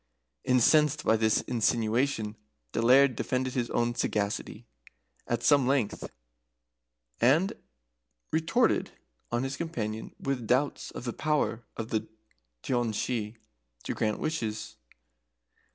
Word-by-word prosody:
Incensed 150 +4 +4
by 110 - +4
this 110 -1 +2
insinuation, 115 -1 0 0.4
the - - -1
Laird 130 +2 +6
defended 130 +2 -1
his 120 -2 -1
own 120 0 +1
sagacity 105 0 -2 0.6
at 120 - -1
some 140 -4 +4
length, 130 -6 0 1.1
and 155 +10 +4 0.8
retorted 165 +10 +2 0.4
on 120 +1 0
his 135 0 -3
companion 110 -10 -4
with 130 -5 -2
doubts 130 +5 +1
of - - -8
the 120 -2 -3
power 150 -7 0 0.2
of 110 0 -4
the 110 0 -1 0.6
Daoiné 120 -4 0
Shi 110 -1 -2 0.5
to - - -3
grant 110 -1 0
wishes. 115 -9 -3
120 Hz, 115 wpm, -29 LUFS, 110-140 Hz, 1.1 s, Laird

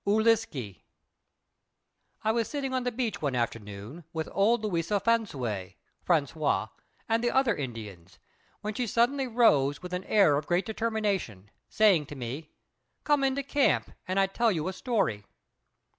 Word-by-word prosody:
ŪLISKE 205 - +1 1.4
I 220 - +3
was 230 -1 0
sitting 275 -3 -3
on 255 -1 -1
the 245 - 0
beach 235 -1 -2
one 140 -4 -1
afternoon 115 +4 -4
with 160 -1 -3
old 220 +3 +2
Louisa 190 0 0
Flansouay 130 - -1 0.3
(François) 155 -3 +1 0.4
and 225 0 +1
the 240 - +3
other 265 -4 +2
Indians, 105 -9 -7 0.4
when 210 +1 -3
she 245 +3 -2
suddenly 250 +5 +2
rose 150 - +3
with 180 0 -7
an 180 +1 -2
air 195 -9 +4
of 150 - -4
great 175 +2 +1
determination, 205 - -2 0.2
saying 195 -9 +4
to 145 - -8
me, 135 +5 -6 0.5
"Come 295 -2 +2
into 270 +1 +1
camp 285 +1 +1 0.2
and 185 +1 0
I 195 - +5
tell 225 +4 +1
you 160 -4 -2
a 190 - -2
story!" 195 - -1
195 Hz, 150 wpm, -28 LUFS, 140-230 Hz, 1.4 s, I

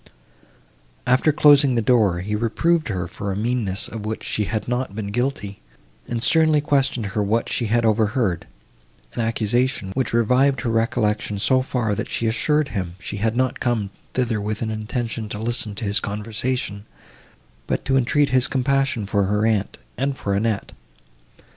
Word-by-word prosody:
After 130 +5 +3
closing 145 -3 +5
the 115 - +2
door 105 -7 +3
he 105 +3 -2
reproved 155 +9 +1
her 90 -6 -2
for 100 +3 -5
a - - -2
meanness, 110 -2 -1
of 110 -2 -7
which 110 +1 -4
she 105 - -1
had 110 +1 -3
not 125 -3 -2
been 105 -2 -4
guilty, 115 - -2 0.5
and 115 -1 -2
sternly 155 +1 +4
questioned 135 -5 +1
her 110 - 0
what 110 +3 0
she 120 - -1
had 115 +2 +2
overheard; 110 -3 +1 0.7
an 120 - -2
accusation, 115 -1 0
which 130 +6 -1
revived 125 +4 +3
her 120 - -1
recollection 110 -2 0
so 130 +6 +3
far, 120 -5 -1
that - - -3
she 115 - -2
assured 150 +6 +1
him 90 -6 -4
she 100 +2 -6
had 110 +2 0
not 130 0 0
come 110 -5 -1 0.2
thither 120 -4 0
with 105 +2 -3
an 110 - -2
intention 110 0 -3
to 105 - -4
listen 110 -1 -2
to 110 - -4
his 100 +2 +1
conversation, 105 0 -3 0.8
but - - -2
to 135 - +1
entreat 140 +3 +2
his 130 -1 +3
compassion 135 -4 0
for 100 0 +1
her 105 +2 +1
aunt, 105 -3 0 0.2
and 135 +1 -1
for 100 - -2
Annette. 105 +1 -1
115 Hz, 170 wpm, -22 LUFS, 105-130 Hz, 0.8 s, closing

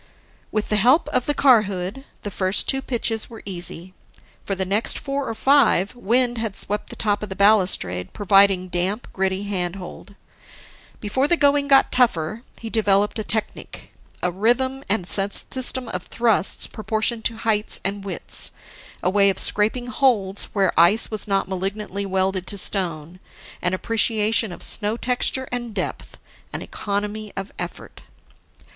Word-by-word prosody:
With 215 -1 -2
the 210 - +1
help 255 - +3
of 250 - -1
the 290 - 0
car 255 -6 +5
hood, 195 +8 -5 0.2
the 205 - -5
first 185 +1 -1
two 270 - +5
pitches 230 -4 -2
were 225 -2 -12
easy. 180 -1 -6 0.5
For 195 - -2
the 190 0 -2
next 205 +4 0
four 275 -1 -4
or 225 - -4
five, 245 -8 +3
wind 245 +1 +1
had 220 -3 -4
swept 210 +1 -3
the - - -8
top 205 -2 -1
of 210 - -6
the 190 - -6
balustrade, 180 - +2
providing 195 -2 +3
damp, 185 +6 -2
gritty 190 0 -1
handhold. 190 0 -5 0.8
Before 260 +7 -1
the 345 - +2
going 285 -1 +2
got 275 -1 +4
tougher, 225 -5 +1 0.2
he 225 - -8
developed 210 -1 +1
a - - -2
technic, 215 0 -2 0.3
a 180 - +1
rhythm 245 +8 0
and 195 -4 -1
system 250 +6 +4
of 180 0 -6
thrusts 230 -4 +2
proportioned 220 +1 -3
to 230 - 0
heights 220 -2 +1
and 200 0 -3
widths, 190 -4 -3 0.5
a 180 - +2
way 200 0 +4
of 195 - -1
scraping 220 +4 +1
holds 235 -7 0
where 195 -3 0
ice 195 +9 +4
was 215 -2 -3
not 195 -1 0
malignantly 195 +1 -4
welded 190 -1 -1
to 200 - -6
stone, 175 -3 -1 0.4
an 180 +1 0
appreciation 220 0 +1
of 175 - -9
snow 215 +1 +1
texture 255 +1 -1
and 240 -3 -5
depth, - - -5 0.4
an - - -4
economy 210 +1 -4
of 195 +1 -5
effort. - - -8
210 Hz, 155 wpm, -22 LUFS, 190-235 Hz, 0.8 s, car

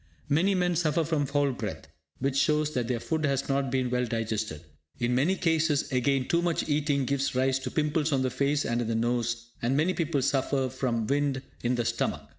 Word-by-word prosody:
Many 180 +7 +3
men 180 -1 +1
suffer 165 0 +1
from 150 -3 0
foul 140 0 +1
breath, 125 - -5 0.3
which 135 0 -1
shows 150 +1 +2
that 125 -4 -1
their 120 -2 -1
food 160 +5 -2
has 140 -2 0
not 135 -1 0
been 130 -1 0
well 125 0 +1
digested. 110 -7 -2 0.4
In 120 0 +1
many 145 +10 +2
cases, 160 -4 +1
again, 130 +1 +1
too 170 - +2
much 175 -1 0
eating 145 -2 +1
gives 135 0 -1
rise 130 +1 +2
to - - -4
pimples 155 0 0
on 135 -2 +2
the 130 - 0
face, 140 +3 +1
and 120 +1 0
in 115 - -2
the 115 - -1
nose; 120 0 -1
and 125 +4 +1
many 170 +5 +2
people 145 -6 0
suffer 135 -1 +1
from 120 -3 -1
wind 140 +1 0 0.2
in 120 +1 +1
the 120 -1 -1
stomach. - - -1
135 Hz, 210 wpm, -28 LUFS, 125-150 Hz, 0.4 s, Many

